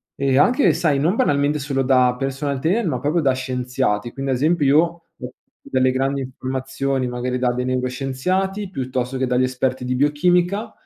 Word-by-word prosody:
e 135 -1 +1
anche, 250 - +4
sai, 150 -5 +1
non 165 +8 +1
banalmente 145 - +1
solo 135 -1 -1
da 125 -1 +3
personal 135 +1 -2
trainer, 185 - 0
ma - - -1
proprio 155 +4 0
da 135 -3 +2
scienziati. 125 -3 -2
Quindi, 135 -1 -3
ad 125 - +1
esempio, 155 +2 +1
io 140 +3 +5
ho 170 0 -3 0.7
delle 130 0 +2
grandi 135 +1 -1
informazioni 130 0 -3
magari 125 +1 -3
da 125 -1 +1
dei 125 +1 -3
neuroscienziati 135 +11 -2
piuttosto 130 -4 -3
che 130 - 0
dagli 125 0 +1
esperti 130 0 -1
di 125 0 -1
biochimica 175 - +1
135 Hz, 170 wpm, -21 LUFS, 130-150 Hz, 0.7 s, io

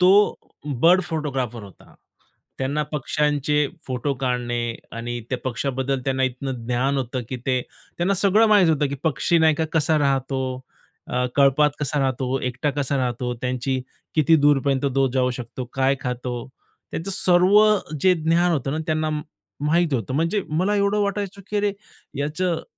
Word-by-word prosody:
तो 180 +1 +6 0.7
bird 180 +3 +6
photographer 135 - -3
होता. 100 -2 -15 0.6
त्यांना 140 +3 -1
पक्ष्यांचे 150 +1 +1 0.2
फोटो 130 +2 -2
काढणे 125 -2 -1 0.4
आणि 120 +1 -4
त्या 130 - -1
पक्षाबद्दल 130 +1 -1
त्यांना 130 -1 0
इतकं 130 -2 -4
ज्ञान 125 +3 0
होतं 130 0 -3
की 130 - -3
ते 130 -1 +2 0.4
त्यांना 185 +3 +2
सगळं 200 +4 +4
माहीत 205 -5 +5
होतं. 150 -2 +2
की 140 - -3
पक्षी 160 +3 +2
नाही 160 -1 +4
का 160 - -1
कसा 160 -1 +2
राहतो. 135 -1 0 0.7
अ, 125 0 0
कळपात 140 +1 +5
कसा 150 0 -1
राहतो. 130 0 0
एकटा 125 +3 -1
कसा 140 0 -1
राहतो. 125 -1 -2
त्यांची 130 +1 -1 0.4
किती 155 +1 +5
दूरपर्यंत 140 -2 +2
तो 135 -1 +3
जाऊ 125 -1 +2
शकतो, 125 +1 -6
काय 135 +1 +2
खातो? 125 0 -3 0.6
त्याचं 175 +5 -3
सर्व 185 +3 +4 0.4
जे 185 +3 +5
ज्ञान 170 +2 +2
होतं 135 -3 -1
ना 155 - -2
त्यांना 155 -1 0 0.5
माहीत 165 +1 +2
होतं. 120 +1 -2
म्हणजे 165 +7 +1
मला 185 +7 +1
एवढं 200 +1 +2
वाटायचं 200 0 -3
की 210 - -1
अरे, 205 0 +1 0.5
याचं 160 +4 -1
140 Hz, 155 wpm, -23 LUFS, 130-165 Hz, 0.7 s, तो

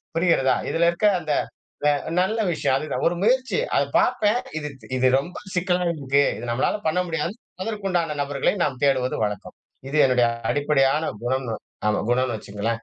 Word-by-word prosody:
புரிகிறதா? 165 -6 +3
இதில 170 +1 +2
இருக்க 210 +5 +1
அந்த 155 -3 -2 0.5
ந்த - - +5 0.3
நல்ல 215 +5 0
விஷயம் 155 -5 0
அதுதான் 140 -3 -2
ஒரு 175 - +3
முயற்சி 255 - +2 0.2
அத - - +4 0.2
பார்ப்பேன் 215 +3 +2 0.2
இது 150 -1 -4 0.3
இது 130 0 +2
ரொம்ப 175 +6 -6 0.2
சிக்கலா 180 0 +1
இருக்கு. 140 -2 +1 0.2
இது 120 - -6
நம்மளால 125 - +1
பண்ண 160 +3 +2
முடியாது, 165 +4 -2 0.3
அதற்க்கு 210 -2 -3
உண்டான 165 -4 0
நபர்களை 140 -1 0
நம்ம 130 -3 -1
தேடுவது 130 -2 +1
வழக்கம். 105 -2 -5 0.3
இது 155 +2 -1
என்னுடைய 125 -2 +3 0.2
அடிப்படையான 145 +1 +2
குணம்னு 125 -3 -1 0.3
அமா 105 - +1
குணம்னு 125 -2 +1
வச்சுக்கங்களேன். 105 +3 -4
145 Hz, 160 wpm, -23 LUFS, 130-175 Hz, 0.5 s, ந்த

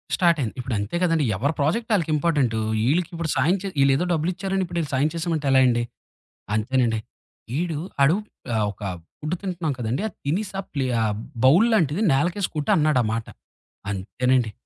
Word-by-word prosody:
స్టార్టయింది. 160 - +2
ఇప్పుడు 125 -1 -2
అంతే 105 +10 -4
కదండీ. 165 -4 +2
ఎవరి 140 - 0
ప్రాజెక్ట్ 225 +12 0
ఆళ్ళకి 165 -6 +1
ఇంపార్టెంటు. 145 -8 +1 0.3
ఈళ్ళకి 170 +4 +2
ఇప్పుడు 165 -1 -3
సాయం 160 +9 +3
చే 200 - -4
ఈళ్ళేదో 135 +5 +3
డబ్బులు 165 +1 +1
ఇచ్చారని 190 +1 -1
ఇప్పుడీళ్ళు 170 -3 -3
సాయం 140 +4 +2
చేసామంటే 165 -3 -2
ఎలా 130 0 +6
అండి? 120 -1 +2 0.7
అంతేనండి. 115 0 +1 0.6
ఈడు 170 -2 -1 0.3
ఆడు 150 +5 +5 0.4
ఆహ్, 110 -1 +2
ఒక 105 - -18 0.4
ఫుడ్టు 155 +4 -2
తింటున్నాం 175 -6 -2
కదండీ 120 - -1
ఆ - - -4 0.2
తినెసా 195 +6 -1
ప్లే 135 -3 0 0.2
ఆహ్, 110 -1 +1 0.3
బౌల్లాంటిది 180 - +4
నలకేసి 175 +7 +1
కొట్టి 150 -1 0
అన్నాడామాట. 120 -8 +1 0.6
అంతేనండి. 115 +5 0
150 Hz, 150 wpm, -24 LUFS, 125-175 Hz, 0.7 s, ఎలా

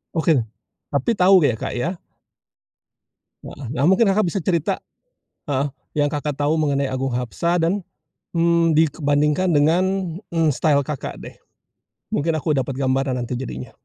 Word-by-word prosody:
Oke. 160 -4 +3 0.5
Tapi 140 - 0
tahu 185 -3 +5
ya, 120 - +3
Kak, - - -4
ya? 170 +8 -2 1.5
Wah. 135 -5 -8
Nah, 130 +3 0
mungkin 190 +4 +4
Kakak 205 0 +2
bisa 185 +3 -1
cerita 170 -2 0 0.7
heeh, 140 +1 0 0.3
yang 145 0 +3
Kakak 145 -1 -2
tahu 145 +2 +1
mengenai 140 -2 +1
Agung 130 0 -2
Hapsah 125 +8 -1
dan, 175 +4 +1 0.6
mmm, 165 -1 +3
dibandingkan 150 +2 +2
dengan, 160 +5 +3 0.5
eee, 165 -2 +2
style 140 0 +2
Kakak 150 -2 -5
deh. - - -10 0.7
Mungkin 165 +3 0
aku 155 0 0
dapat 135 +1 -1
gambaran 135 -1 0
nanti 120 +1 -3
jadinya. 65 - -6
150 Hz, 145 wpm, -21 LUFS, 135-170 Hz, 1.5 s, tahu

